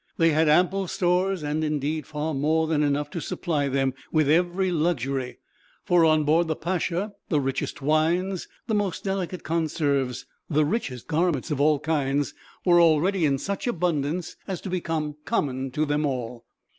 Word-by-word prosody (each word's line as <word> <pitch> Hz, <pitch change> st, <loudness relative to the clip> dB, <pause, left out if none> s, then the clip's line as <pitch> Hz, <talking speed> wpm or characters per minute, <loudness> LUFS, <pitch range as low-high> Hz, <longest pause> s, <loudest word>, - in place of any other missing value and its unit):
They 165 Hz, 0 st, +4 dB
had 155 Hz, +1 st, +3 dB
ample 185 Hz, +4 st, +3 dB
stores 185 Hz, -1 st, +1 dB
and, 150 Hz, +2 st, -1 dB
indeed, 150 Hz, -1 st, -2 dB
far 155 Hz, +1 st, -3 dB
more 155 Hz, +3 st, +1 dB
than 155 Hz, -2 st, +1 dB
enough 145 Hz, 0 st, 0 dB
to 170 Hz, -, -4 dB
supply 150 Hz, -5 st, -1 dB
them 135 Hz, -1 st, 0 dB, 0.2 s
with 155 Hz, -3 st, +3 dB
every 180 Hz, +3 st, +2 dB
luxury; 140 Hz, -6 st, -1 dB, 0.5 s
for 175 Hz, -2 st, +4 dB
on 155 Hz, -1 st, +4 dB
board 160 Hz, +3 st, +3 dB
the 160 Hz, -, -1 dB
Pacha 180 Hz, +4 st, -2 dB, 0.2 s
the 150 Hz, -, +2 dB
richest 135 Hz, 0 st, -3 dB
wines, 170 Hz, +5 st, +1 dB, 0.2 s
the 225 Hz, -, -2 dB
most 205 Hz, -5 st, -1 dB
delicate 190 Hz, -2 st, -3 dB
conserves, 145 Hz, -6 st, -1 dB, 0.2 s
the 155 Hz, -1 st, +3 dB
richest 145 Hz, -, -3 dB
garments 165 Hz, -2 st, 0 dB
of 145 Hz, -1 st, 0 dB
all 150 Hz, 0 st, +4 dB
kinds 145 Hz, -2 st, 0 dB, 0.3 s
were 175 Hz, -1 st, +6 dB
already 170 Hz, +3 st, +3 dB
in 140 Hz, -2 st, +2 dB
such 200 Hz, -, -4 dB
abundance 170 Hz, -, -1 dB
as 190 Hz, -4 st, -3 dB
to 190 Hz, -, -6 dB
become 160 Hz, -4 st, -2 dB
common 135 Hz, -1 st, -1 dB
to 150 Hz, +4 st, 0 dB
them 150 Hz, +1 st, 0 dB
all. 125 Hz, -3 st, -4 dB
155 Hz, 165 wpm, -25 LUFS, 145-175 Hz, 0.5 s, were